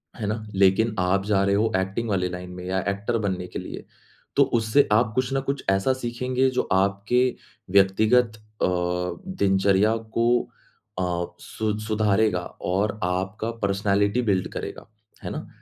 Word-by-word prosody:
हैं 110 -4 -4
ना? 110 +1 -3
लेकिन 100 +3 +3
आप 95 +2 +1
जा 100 -2 +2
रहे 100 0 +2
हो 110 +2 +2
एक्टिंग 95 +5 -2
वाली 95 -3 0
लाइन 90 0 -7
में 90 0 -8
या 95 +1 0
एक्टर 100 +4 -1
बनने 95 -4 -2
के - - -6
लिए, - - -8 0.5
तो - - +6
उससे 115 +4 +2
आप 110 +1 +3
कुछ 130 0 0
ना 135 - +2
कुछ 140 0 -3
ऐसा 95 +6 +2
सीखेंगे 125 +1 0
जो 130 - 0
आपके 100 +6 +2 0.5
व्यक्तिगत 110 +4 +4 0.2
अ, - - +4 0.7
दिनचर्या 100 +2 +3 0.2
को 115 0 +3 0.7
अ, 90 -1 -1
सु 110 -1 -3
सुधारेगा 105 -2 +1 0.2
और 100 +4 -1
आपका 95 +5 -2
पर्सनैलिटी 100 +3 +1
बिल्ड 95 -2 +1
करेगा, - - -6 0.4
हैं - - -4
ना? - - -6
100 Hz, 155 wpm, -24 LUFS, 95-115 Hz, 0.7 s, तो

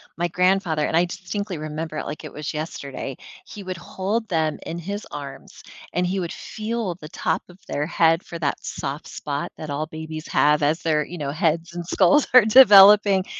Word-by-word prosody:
my 175 +1 -1
grandfather 180 -4 +1
and - - -1
I 170 - +5
distinctly 190 0 -5
remember 155 +1 -5
it - - -4
like 150 - -7
it - - -8
was 150 0 -5
yesterday, 140 -4 -6 0.3
he 205 - -10
would 185 -1 -5
hold 200 +6 -3
them 160 -3 0
in 165 - -5
his 200 +5 -5
arms, 140 -2 -9 0.3
and 180 0 0
he 190 +1 -1
would 170 - -4
feel 215 -4 -4
the 155 - -9
top 160 +3 -1
of 175 +2 -16
their 145 +1 -2
head 165 0 +2
for 170 - -8
that 145 -3 -2
soft 140 +3 -5
spot 145 -1 -4
that 155 - -7
all 145 +2 -2
babies 155 -1 -7
have 150 0 +3
as 155 +3 +1
their, 155 -2 +1
you 175 - -8
know, 140 -2 -3
heads 165 +1 -1
and 175 -1 -5
skulls 185 - +3
are 250 -4 +8
developing. 205 -4 +7
170 Hz, 195 wpm, -23 LUFS, 155-190 Hz, 0.3 s, are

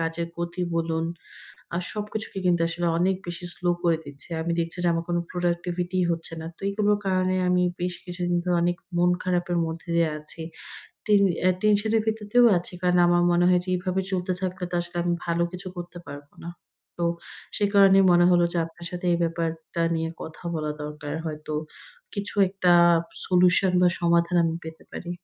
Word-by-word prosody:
কাজের 165 +1 -2
গতি 170 +1 -3
বলুন 165 0 0 0.7
আর 180 - -1
সবকিছুকে 210 -1 -5
কিন্তু 175 -1 +3
আসলে 175 +1 -2
অনেক 185 +2 +2
বেশি 175 +1 -6
স্লো 175 0 0
করে 165 -2 +2
দিচ্ছে। 140 +3 -11
আমি 170 - -1
দেখছি 165 +2 -4
যে, 175 - +4
আমার 165 0 -1
কোন 175 0 +1
প্রোডাক্টিভিটিই 175 +1 -1
হচ্ছে 165 0 -2
না। 160 - -6
তো - - -26
এইগুলোর 205 0 +1
কারণে 185 -1 +1
আমি 180 0 +3 0.2
বেশ 180 0 -1
কিছুদিন 175 -1 -2
ধরে 180 -1 +1
অনেক 175 0 +1 0.2
মন 175 +1 +4
খারাপের 175 -1 0
মধ্য 160 +1 -5
দিয়ে 165 -1 +3
আছি। 155 +2 -6 0.6
টেন 205 -2 +5 0.3
এ - - +6
টেনশনের 215 +1 +2
এর - - 0
ভিতরেও 220 +2 +2
আছি। 175 - -6
কারণ 180 0 +3
আমার 175 0 +4
মনে 175 +1 +3
হয় 180 -1 +4
যে - - -14
এভাবে 185 +1 -1
চলতে 185 0 0
থাকলে 185 0 -3
তো - - -4
আসলে 175 +1 -8
আমি 175 0 +1
ভালো 170 0 +1
কিছু 180 0 -6
করতে 175 0 -7
পারব 145 0 -9 0.2
না। 170 - -5 0.5
তো 170 - 0 0.5
সে 205 - +1
কারণেই 195 -1 +7
মনে 175 0 +5
হল 175 - +5
যে - - -3
আপনার 170 +1 -12
সাথে 180 0 -5
এই 170 - +1
ব্যাপারটা 165 0 -2
নিয়ে 165 0 -2
কথা 160 - -10
বলা 155 -1 -2
দরকার 150 0 -6
হয়তো। 155 -1 -5 0.6
কিছু 200 0 -4
একটা 185 -2 +2 0.5
solution 180 +1 +4
বা 180 - +6
সমাধান 170 +1 +2
আমি 165 0 0
পেতে 160 0 -9
পারি। 175 - -6
175 Hz, 185 wpm, -25 LUFS, 170-185 Hz, 0.7 s, কারণেই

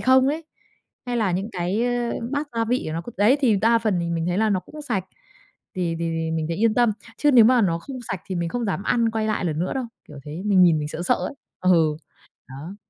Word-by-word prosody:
không 260 +1 +4
ấy, 315 +2 -2 0.6
hay 245 -1 -1
là 205 -6 +1
những 195 +5 -2
cái 185 +4 -1 0.5
bát 290 +1 -1
gia 230 - +2
vị 250 +3 0
của 155 - -3
nó 165 - -2
c - - -14
đấy, 215 +7 +4
thì 235 -7 +3
đa 230 +3 +3
phần 215 -6 0
thì 170 0 -2
mình 165 0 -1
thấy 180 +2 0
là 220 0 +2
nó 190 -2 +1
cũng 305 +10 -11
sạch, 220 -10 -2 0.7
thì 170 -3 -1
thì 165 -1 -2
mình 160 -1 -1
thấy 165 - -2
yên 220 +2 +2
tâm. 240 -3 +3 0.2
Chứ 295 - +3
nếu 240 -4 +7
mà 250 +1 +5
nó 170 -3 +1
không 260 +8 -8
sạch 190 - -3
thì 190 - -4
mình 170 -1 -1
không 240 +7 -3
dám 200 -2 -2
ăn, 230 +1 +1
quay 220 -1 -1
lại 215 -3 -1
lần 155 -3 -1
nữa 180 +3 -1
đâu, 265 -2 -2 0.2
kiểu 150 - -10
thế, 155 +5 -6
mình 195 -3 +5
nhìn 165 -3 +5
mình 150 - -3
sợ 165 - -5
sợ 250 - +3
ấy. - - -4 0.3
Ừ, 165 -4 +3 0.5
đó. 145 +9 -8
195 Hz, 255 wpm, -23 LUFS, 170-235 Hz, 0.7 s, nếu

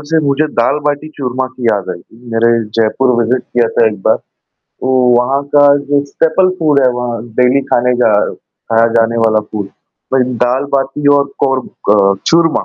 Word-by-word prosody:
से 160 - +3
मुझे 140 +2 +1
दाल 150 - +2
बाटी 145 +1 -2
चूरमा 130 -1 -3
की 125 - -7
याद 100 -5 0
आई 90 - -6
कि 115 +6 -21
मेरे 115 +1 +2
जयपुर 115 +4 0
विजिट 125 +2 -1
किया 120 -2 0
था 115 - +2
1 105 -3 -2
बार। - - +3 0.4
तो 130 - -8 0.3
वहाँ 135 +3 +1
का 145 0 +6
जो 140 0 -1
स्टेपल 165 +6 +1
फूड 150 -4 +2
है, 130 - +3
वहाँ 120 -2 -4
डेली 125 +2 +3
खाने 125 +1 +2
का 110 - +3 0.2
खाया 115 0 -2
जाने 115 0 +2
वाला 110 -1 +2
फूड। 100 -2 -4 0.5
मैं 130 - +3
दाल 125 +4 0
बाटी 135 +2 -2
और 140 0 0
कोर 135 -2 0 0.3
क 100 -1 +3
चूरमा। 165 -1 +2
125 Hz, 180 wpm, -13 LUFS, 115-140 Hz, 0.5 s, का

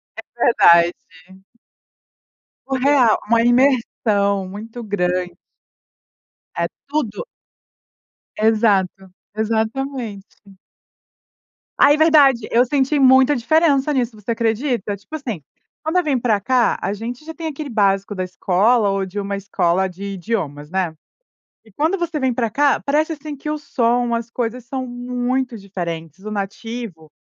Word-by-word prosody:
É 220 - -6 0.2
verdade. 170 -6 +5 1.7
O 270 - -2
real, 260 -4 +4
uma 230 +1 +4
imersão 230 -6 +2
muito 225 +4 -8
grande. 180 -3 -1 1.2
É - - 0 0.2
tudo! 290 - -3 1.1
Exato. 205 -4 +1 0.2
Exatamente. 220 -2 -3 1.3
Ai, 290 +1 +6
verdade. 290 -7 +5
Eu 240 +2 +5
senti 280 +2 +1
muita 265 +2 +5
diferença 290 +2 +2
nisso, 245 -3 -1
você 210 +2 -5
acredita? 230 -2 -1
Tipo 200 +10 -10
assim, 240 - -5 0.4
quando 315 +3 0
eu 360 - +3
vim 285 -5 0
pra 225 -4 +1
cá 245 +3 +2
a 200 - -1
gente 240 +7 -7
já 320 - -7
tem 325 0 -6
aquele 300 -1 -6
básico 200 -3 +1
da 185 - -2
escola 200 +5 +2
ou 195 -1 -1
de 190 +2 -6
uma 200 0 -3
escola 190 -2 0
de 185 +2 -11
idiomas, 165 -7 -4
né? 185 -2 -1 0.7
E 220 - -21
quando 315 - 0
você 340 -3 -2
vem 260 -1 +1
pra 230 -2 -1
cá, 285 +4 +2
parece 305 +3 +1
assim 300 0 -8
que 285 +2 -8
o 305 - -1
som, 240 -4 0
as 230 0 -3
coisas 240 0 -3
são 260 +1 -4
muito 245 +1 -2
diferentes, 175 -3 -6
o 215 - -4
nativo, 200 -4 -6
230 Hz, 135 wpm, -20 LUFS, 200-265 Hz, 1.7 s, Ai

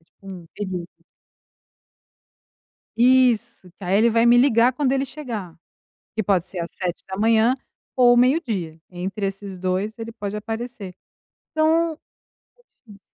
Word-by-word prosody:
é - - -32
tipo - - -48
um 185 -3 -9
período. 185 -4 -4 2.1
Isso, 240 -5 +3
que 195 - -9
aí, 185 +2 +2
ele 230 +3 +4
vai 230 +1 +3
me 240 0 +6
ligar 245 -1 +4
quando 265 0 +1
ele 270 0 0
chegar, 225 - -7 0.6
que 220 - -1
pode 190 -3 +1
ser 185 -1 -6
às 170 - -5
7 220 +7 +1 0.4
ou 245 -1 +6
meio 255 +6 +4
dia. 175 - -5
Entre 190 +3 -4
esses 195 -1 -6
2, 185 +5 -2
ele 230 0 -6
pode 205 -2 -5
aparecer. 225 -2 -6 0.6
Então 320 +1 +2
a - - -16 1.0
chance 200 - -16
220 Hz, 140 wpm, -22 LUFS, 190-245 Hz, 2.1 s, me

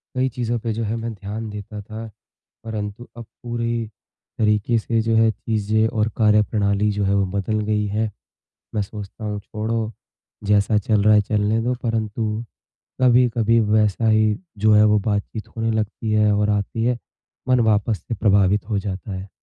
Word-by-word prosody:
कई 130 +1 +1
चीज़ों 120 -1 -2
पे 115 0 -2
जो 115 +1 -3
है 110 +1 -2
मैं 115 0 -4
ध्यान 105 +2 -6
देता 105 0 -7
था। 110 +2 -8 0.6
परंतु 110 +1 -5
अब 120 - -8 0.2
पूरी 115 -1 -2 0.5
तरीक़े 105 +1 +2
से 115 +1 0
जो 115 0 +1
है 110 0 +5
चीज़ें 110 0 0
और 110 -1 0
कार्यप्रणाली 105 -1 +2
जो 105 0 -1
है 100 - +2
वो 100 -1 +2
बदल 110 +2 -1
गई 105 0 0
है। 105 +1 -1 0.6
मैं 105 - +1
सोचता 105 +1 -8
हूँ 105 -1 -2
छोड़ो, 110 +2 -3 0.5
जैसा 105 +1 +3
चल 105 0 +1
रहा 110 0 +6
है 105 - +6
चलने 105 +1 0
दो 125 +2 0
परंतु 110 -1 -2 0.6
कभी-कभी 120 -2 +4
वैसा 110 0 +2
ही 110 -1 +3 0.2
जो 110 +1 +4
है 105 0 +6
वो 105 0 +4
बातचीत 105 +1 -3
होने 115 0 0
लगती 110 0 -2
है 105 -1 +4
और 105 +1 +1
आती 105 +2 -1
है। 120 +1 +1 0.5
मन 125 -1 +4
वापस 110 -1 +2
से 115 - -2
प्रभावित 100 0 +2
हो 105 -3 +1
जाता 100 +1 -5
है। 95 +1 -6
110 Hz, 175 wpm, -22 LUFS, 105-115 Hz, 0.6 s, रहा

